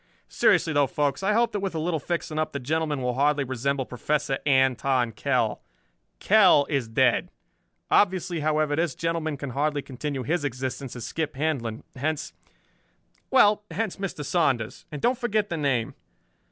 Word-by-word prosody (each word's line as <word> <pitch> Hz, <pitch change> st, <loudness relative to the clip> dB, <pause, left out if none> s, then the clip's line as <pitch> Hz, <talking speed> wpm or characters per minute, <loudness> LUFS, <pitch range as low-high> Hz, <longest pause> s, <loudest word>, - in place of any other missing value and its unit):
"Seriously 160 Hz, -, +3 dB
though, 145 Hz, -1 st, +3 dB
folks, 145 Hz, +3 st, -1 dB
I 195 Hz, +2 st, +1 dB
hope 235 Hz, +2 st, +2 dB
that 205 Hz, -, -2 dB
with 195 Hz, -3 st, -3 dB
a -, -, -1 dB
little 160 Hz, 0 st, -1 dB
fixing 155 Hz, 0 st, -3 dB
up 155 Hz, -, -1 dB
the 140 Hz, -, -3 dB
gentleman 150 Hz, 0 st, -1 dB
will 125 Hz, 0 st, 0 dB
hardly 145 Hz, +2 st, +2 dB
resemble 130 Hz, +1 st, -2 dB
Professor 135 Hz, +2 st, -1 dB
Anton 130 Hz, -2 st, +2 dB
Kell. 120 Hz, -1 st, 0 dB, 0.6 s
Kell 145 Hz, -, +5 dB
is 135 Hz, -5 st, 0 dB
dead. 110 Hz, -, +2 dB, 0.6 s
Obviously, 185 Hz, -3 st, +2 dB
however, 155 Hz, -1 st, +1 dB
this 165 Hz, -3 st, 0 dB
gentleman 165 Hz, -3 st, -2 dB
can 140 Hz, -2 st, -5 dB
hardly 145 Hz, +2 st, -1 dB
continue 135 Hz, 0 st, -4 dB
his 155 Hz, +5 st, -1 dB
existence 130 Hz, -1 st, -4 dB
as 120 Hz, -, -6 dB
Skip 160 Hz, -3 st, -3 dB
Handlon. 135 Hz, -7 st, -2 dB
Hence 155 Hz, +3 st, -3 dB, 1.0 s
well, 210 Hz, -5 st, +5 dB
hence 220 Hz, -3 st, -3 dB
Mr. 190 Hz, -7 st, -5 dB
Saunders. 135 Hz, -10 st, 0 dB
And 150 Hz, -2 st, -7 dB
don't 245 Hz, +1 st, +2 dB
forget 215 Hz, -4 st, 0 dB
the 170 Hz, -, -2 dB
name. 135 Hz, -6 st, 0 dB
145 Hz, 160 wpm, -26 LUFS, 130-165 Hz, 1.0 s, Kell